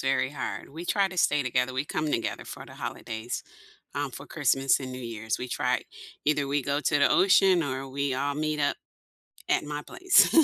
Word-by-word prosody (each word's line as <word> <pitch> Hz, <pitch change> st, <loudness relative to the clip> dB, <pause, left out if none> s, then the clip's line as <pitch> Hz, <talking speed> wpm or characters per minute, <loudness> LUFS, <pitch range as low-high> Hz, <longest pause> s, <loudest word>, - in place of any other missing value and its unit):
very 135 Hz, 0 st, +1 dB
hard, 140 Hz, -1 st, -5 dB
we 165 Hz, +4 st, -7 dB
try 200 Hz, +1 st, +2 dB
to 185 Hz, -1 st, -6 dB
stay 150 Hz, -3 st, +3 dB
together, 130 Hz, 0 st, 0 dB
we 130 Hz, -, 0 dB
come 155 Hz, 0 st, -2 dB
together 115 Hz, -, -1 dB
for -, -, -8 dB
the -, -, -13 dB
holidays, 110 Hz, +2 st, -5 dB, 0.5 s
um, -, -, -1 dB
for -, -, -9 dB
Christmas 135 Hz, +1 st, +2 dB
and 130 Hz, -, -5 dB
New 130 Hz, -, -6 dB
Year's, 110 Hz, -2 st, -3 dB
we 125 Hz, -, -4 dB
try -, -, 0 dB, 0.4 s
either 145 Hz, -1 st, +2 dB
we 145 Hz, 0 st, +1 dB
go 140 Hz, +2 st, 0 dB
to 150 Hz, -1 st, +2 dB
the 140 Hz, -, +4 dB
ocean 190 Hz, -2 st, +5 dB
or 135 Hz, -2 st, -3 dB
we 140 Hz, 0 st, -1 dB
all 140 Hz, +2 st, -1 dB
meet 155 Hz, 0 st, -1 dB
up 145 Hz, -, +2 dB, 0.7 s
at -, -, +3 dB
my 150 Hz, 0 st, -4 dB
place, 370 Hz, -, +4 dB
140 Hz, 200 wpm, -28 LUFS, 130-150 Hz, 0.7 s, ocean